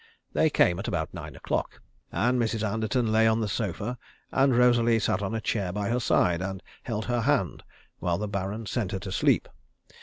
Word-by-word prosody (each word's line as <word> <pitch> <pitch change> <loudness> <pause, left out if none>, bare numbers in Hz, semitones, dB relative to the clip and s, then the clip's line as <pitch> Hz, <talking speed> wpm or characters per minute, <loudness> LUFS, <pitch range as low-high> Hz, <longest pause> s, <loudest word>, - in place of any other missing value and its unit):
They 160 - +3
came 90 -10 +3
at 100 - -4
about 80 -3 -2
nine - - -8
o'clock, - - -3 0.3
and 120 +8 +1
Mrs. 110 -1 0
Anderton 110 +2 0
lay 110 +1 +4
on 110 0 +3
the 110 - 0
sofa, 110 +3 -3 0.3
and 135 -2 +3
Rosalie 120 -2 +4
sat 100 -3 0
on 100 +2 -2
a - - 0
chair 100 -4 -1
by 100 +1 -2
her 120 +1 +1
side, 90 -7 +2
and 95 0 -4 0.2
held 110 -3 -3
her 120 -1 0
hand 115 - +1 0.4
while 85 -1 0
the 105 - -3
Baron 100 +2 -3
sent 105 -2 -2
her 95 - -2
to 95 0 -6
sleep. - - +2
110 Hz, 200 wpm, -27 LUFS, 95-120 Hz, 0.4 s, lay